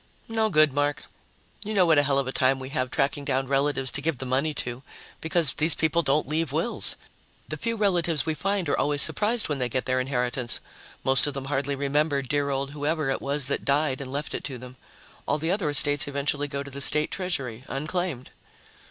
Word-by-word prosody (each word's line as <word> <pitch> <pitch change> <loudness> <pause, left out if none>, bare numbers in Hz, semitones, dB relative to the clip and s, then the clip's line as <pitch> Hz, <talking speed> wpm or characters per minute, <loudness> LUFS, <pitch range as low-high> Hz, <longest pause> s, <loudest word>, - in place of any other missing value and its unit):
"No 225 -1 +1
good, 155 -6 +4
Mark. 145 0 0 0.6
You 215 +1 -4
know 185 -2 +5
what 160 -3 +5
a - - +6
hell 140 -1 +1
of 140 - +1
a - - -1
time 130 0 +2
we 130 0 -7
have 130 -3 -1
tracking 140 +1 0
down 135 -1 0
relatives 135 -1 +1
to 140 - -2
give 160 -1 -1
the 130 - -5
money 135 +5 +1
to, 120 -1 -4 0.4
because 160 -2 +1
these 155 0 +4
people 160 +1 +2
don't 145 -1 +1
leave 155 0 -1
wills. 165 +10 0 0.5
The - - -4
few 230 0 -2
relatives 175 -7 +1
we 160 - 0
find 195 +4 -1
are - - +2
always 145 -1 +1
surprised 210 +9 +1
when 145 -3 -2
they 125 -1 -1
get 130 +2 -2
their 130 -1 +1
inheritance 125 -1 -2 0.4
most 135 +2 +4
of 145 - -3
them 135 -1 -4
hardly 140 0 -1
remember 140 +1 +1
dear 140 +2 0
old 135 0 -2
who 145 0 -4
ever 155 -3 0
it - - -2
was 140 0 -1
that 140 - -2
died 140 -1 +1
and 130 -1 -6
left 145 +2 -3
it - - -4
to 135 -3 -4
them. 125 +1 -11 0.5
All - - +1
the 160 +3 -1
other 190 -5 0
estates 145 0 +4
eventually 145 +1 -1
go 140 -1 -4
to 140 - -10
the 140 +1 -5
State 150 +2 +4
treasury, 135 - -3
unclaimed." 150 -1 -3
145 Hz, 220 wpm, -26 LUFS, 135-155 Hz, 0.6 s, a